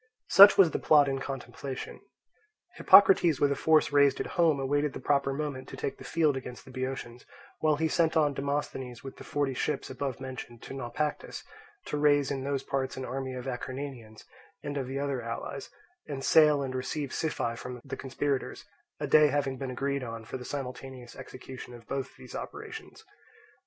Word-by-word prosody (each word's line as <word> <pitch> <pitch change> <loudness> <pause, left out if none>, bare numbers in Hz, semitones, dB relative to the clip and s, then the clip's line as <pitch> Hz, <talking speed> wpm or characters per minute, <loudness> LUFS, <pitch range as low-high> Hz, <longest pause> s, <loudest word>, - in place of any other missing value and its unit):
Such 200 +3 +9
was 180 -5 +6
the - - -2
plot 150 -2 +5
in 135 -1 -1
contemplation. 135 0 -6 0.8
Hippocrates 185 -6 +6
with 145 -1 +3
a - - +1
force 155 0 +3
raised 140 -1 +4
at - - -2
home 165 -5 +3
awaited 145 +2 0
the - - -6
proper 140 -1 +1
moment 135 -2 -4
to - - -9
take - - -4
the - - -10
field 155 -4 +1
against 125 -2 -7
the 130 - -12
Boeotians; 130 -2 -5 0.4
while 155 -1 +3
he 160 +2 0
sent 160 0 +2
on 150 -2 +3
Demosthenes 135 -3 -3
with 135 - -9
the - - -10
forty 145 -2 -1
ships 130 +2 -2
above 130 -1 -4
mentioned 130 -3 -8
to - - -8
Naupactus, 135 +3 -4 0.4
to - - -3
raise 145 -2 +3
in 135 -1 -3
those 140 -1 -2
parts 130 -1 -2
an 130 - -4
army 130 +1 -4
of 125 0 -6
Acarnanians 130 -3 -6 0.4
and 145 - -4
of 135 -3 -2
the 135 +1 -4
other 140 -2 -2
allies, 115 0 -6 0.4
and 135 -2 -5
sail 150 -2 +5
and 130 -1 -4
receive 130 +2 -3
Siphae 135 -7 -1
from 125 +1 -7
the - - -5
conspirators; 135 0 -3 0.3
a - - -2
day 150 -1 +6
having 135 -2 -1
been 135 - -4
agreed 140 +2 -2
on 115 -2 -6
for 130 - -5
the 125 - -9
simultaneous 130 -2 -7
execution 130 -1 -10
of 115 -1 -14
both 135 -1 -4
these 130 -1 -12
operations. 435 +1 -8
135 Hz, 185 wpm, -29 LUFS, 130-145 Hz, 0.8 s, Such